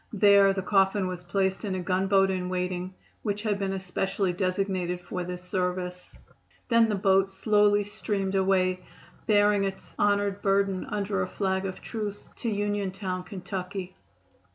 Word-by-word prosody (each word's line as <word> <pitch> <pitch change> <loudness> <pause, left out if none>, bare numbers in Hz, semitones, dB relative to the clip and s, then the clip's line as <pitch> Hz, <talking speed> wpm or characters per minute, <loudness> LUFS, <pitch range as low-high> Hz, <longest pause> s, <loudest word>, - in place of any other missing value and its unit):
There 200 -1 +6
the 190 -1 -2
coffin 195 0 +2
was 180 -1 -4
placed 190 +2 0
in 195 -3 -2
a - - -2
gunboat 195 +1 +2
in 180 -1 -2
waiting, 180 0 -3 0.3
which 210 0 -2
had 210 -2 0
been 195 -1 -1
especially 190 0 -1
designated 185 -1 -1
for 180 0 -5
this 180 0 -6
service. 180 0 -3 0.6
Then 230 -1 +5
the 210 - +1
boat 195 0 +3
slowly 205 +1 +3
steamed 200 -1 -2
away, 185 -1 +2 0.5
bearing 205 -1 +4
its 195 -1 -5
honored 205 -1 +1
burden 195 -1 +1
under 200 -1 -2
a 185 - -1
flag 190 0 -1
of 185 - -7
truce 210 -3 -5
to 235 - -2
Uniontown, 200 -3 -2
Ky. 185 -1 -5
195 Hz, 150 wpm, -27 LUFS, 185-205 Hz, 0.6 s, There